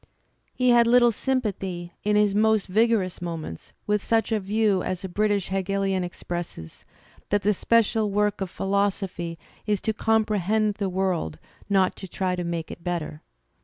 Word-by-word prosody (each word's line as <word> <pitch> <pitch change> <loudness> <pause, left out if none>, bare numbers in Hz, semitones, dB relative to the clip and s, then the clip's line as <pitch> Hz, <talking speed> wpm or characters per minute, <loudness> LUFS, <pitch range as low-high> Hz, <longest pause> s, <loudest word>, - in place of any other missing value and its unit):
He 250 -1 +2
had 235 -1 +5
little 240 0 +6
sympathy, 195 -8 -2
in 210 0 +2
his 210 -1 +3
most 215 0 +3
vigorous 210 -2 +1
moments, 165 - -6
with 210 -1 0
such 225 -1 +1
a 220 - +2
view 205 -1 +1
as 185 0 -3
a - - -3
British 205 +1 0
Hegelian 195 0 0
expresses, 175 - -6 0.4
that 205 0 +1
the 210 +2 +3
special 220 +1 +2
work 210 0 0
of 190 - -2
philosophy 195 -3 -1 0.3
"is 210 -2 +1
to 220 - 0
comprehend 215 -1 +1
the 200 -2 0
world, 180 - -1 0.3
not 190 -2 +3
to 190 - -8
try 185 0 -1
to 180 - -3
make 170 -1 -3
it 170 - -10
better." 170 -4 -3
200 Hz, 160 wpm, -25 LUFS, 180-215 Hz, 0.4 s, little